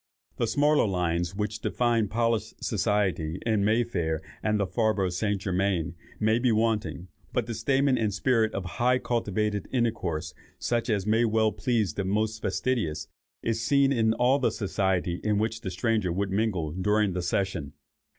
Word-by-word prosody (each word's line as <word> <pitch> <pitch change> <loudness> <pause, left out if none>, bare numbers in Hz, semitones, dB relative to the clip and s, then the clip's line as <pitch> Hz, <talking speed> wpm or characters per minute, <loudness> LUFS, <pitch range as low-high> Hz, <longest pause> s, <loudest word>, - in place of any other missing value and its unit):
The 115 - 0
smaller 145 +2 +3
lines 90 -1 -1
which 105 +1 -2
define 115 -1 +1
polished 115 0 -1
society 95 -6 0
in 110 -3 +2
May 110 +4 +3
Fair, 85 -9 -2 0.2
and 105 -1 +1
the 100 - +2
Faubourg 105 -3 +1
St. 100 +3 -1
Germain, 95 -3 0 0.3
may 110 +2 +3
be 125 -1 +2
wanting, 110 -5 0 0.2
but 125 -3 0
the 115 - -4
stamen 135 +4 +2
and 110 -2 +1
spirit 110 +1 +2
of 100 - -3
high 120 +7 +1
and 130 - -3
cultivated 105 -3 -1
intercourse, 95 -11 -1 0.2
such 120 +1 -1
as 100 -3 +1
may 110 +2 +3
well 110 -1 +2
please 110 - 0
the 100 - -2
most 110 +3 -1
fastidious, 115 -12 -1 0.3
is 115 -1 -1
seen 140 +3 +3
in 110 -3 +2
all 125 +4 +3
the 130 - +2
society 95 -3 -1
in 105 -1 +1
which 110 +1 -1
the 95 - -4
stranger 95 0 0
would 95 +2 -1
mingle 95 -7 0
during 105 +3 +1
the 90 - -2
session. 85 -5 -2
105 Hz, 170 wpm, -27 LUFS, 95-115 Hz, 0.3 s, smaller